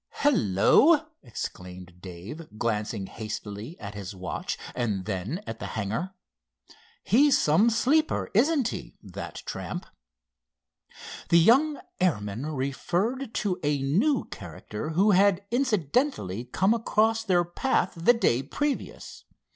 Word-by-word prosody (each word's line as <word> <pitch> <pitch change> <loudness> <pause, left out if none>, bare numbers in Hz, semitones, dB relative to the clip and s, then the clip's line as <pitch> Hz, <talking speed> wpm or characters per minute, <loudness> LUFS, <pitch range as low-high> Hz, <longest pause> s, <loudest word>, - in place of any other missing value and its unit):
"Hello!" 285 - +4 0.2
exclaimed 90 -6 -8
Dave, 100 - -9
glancing 105 -2 -2
hastily 110 - -7
at 100 0 -7
his 100 -1 -7
watch 90 -1 -4 0.2
and 105 -6 -2
then 105 - -3
at 115 - -6
the - - -5
hangar. 110 - -3 0.9
"He's 280 +5 +5
some 180 +10 +4
sleeper; 275 +8 +1
isn't 270 +2 +3
he, 180 - -7
that 95 -4 -8
tramp?" - - -5 1.4
The 170 - +6
young 270 - +4 0.2
airman 120 - -1
referred 175 - -2
to 195 -4 -1
a 145 -1 0
new 220 - +2
character 105 - -7
who 190 +6 +3
had 200 0 +3
incidentally 215 - 0
come 190 - +2
across 225 0 +1
their 180 -5 +3
path 185 +3 0
the 170 +9 +4
day 130 - +2
previous. 285 - -4
165 Hz, 115 wpm, -27 LUFS, -, 1.4 s, The